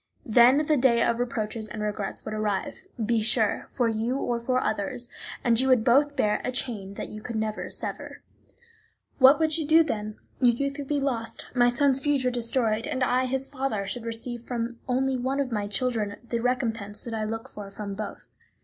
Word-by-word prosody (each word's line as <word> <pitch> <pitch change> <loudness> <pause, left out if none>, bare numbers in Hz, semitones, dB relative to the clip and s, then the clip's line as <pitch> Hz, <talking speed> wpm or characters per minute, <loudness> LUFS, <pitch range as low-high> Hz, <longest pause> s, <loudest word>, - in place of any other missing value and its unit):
Then 245 +6 +5
the 305 0 +3
day 245 -2 +4
of 235 0 +1
reproaches 220 -2 -2
and 215 -1 -5
regrets 205 -2 -3
would 215 - -4
arrive, 215 - -2 0.2
be 230 0 +2
sure, 220 -1 +1
for 245 - 0
you 225 +3 -1
or 240 -3 -1
for 255 +2 +1
others, 220 +2 -2 0.3
and 235 -1 +4
you 260 - +3
would 255 -4 +4
both 285 +5 +4
bear 210 -5 +1
a 255 - -1
chain 215 -6 -3
that - - -5
you 215 - -8
could 235 +1 -6
not 220 0 0 0.2
sever. - - -5 1.0
What 265 +2 +8
would 320 0 +1
you 305 - -2
do 325 +1 +7
then? 215 -7 -4 0.2
Your 245 -2 +4
youth 280 +3 -2
would 280 - -5
be 290 0 0
lost, 245 -5 -2
my 245 -1 +4
son's 270 +2 +3
future 270 -2 +1
destroyed; 230 -2 0
and 260 - -1
I, 255 +1 +2
his 265 +1 -1
father, 260 -8 -2
should 225 +4 -5
receive 235 +1 -5
from 235 -1 -3
only 260 +1 +1
one 260 +3 -1
of 270 -3 -1
my 210 -2 -1
children 210 -1 -1
the 235 - -1
recompense 230 -4 -1
that 235 - -6
I 220 -1 -1
look 225 +1 -4
for 205 -1 -9
from 200 0 -6
both. 210 +1 -7
240 Hz, 200 wpm, -26 LUFS, 215-260 Hz, 1.0 s, What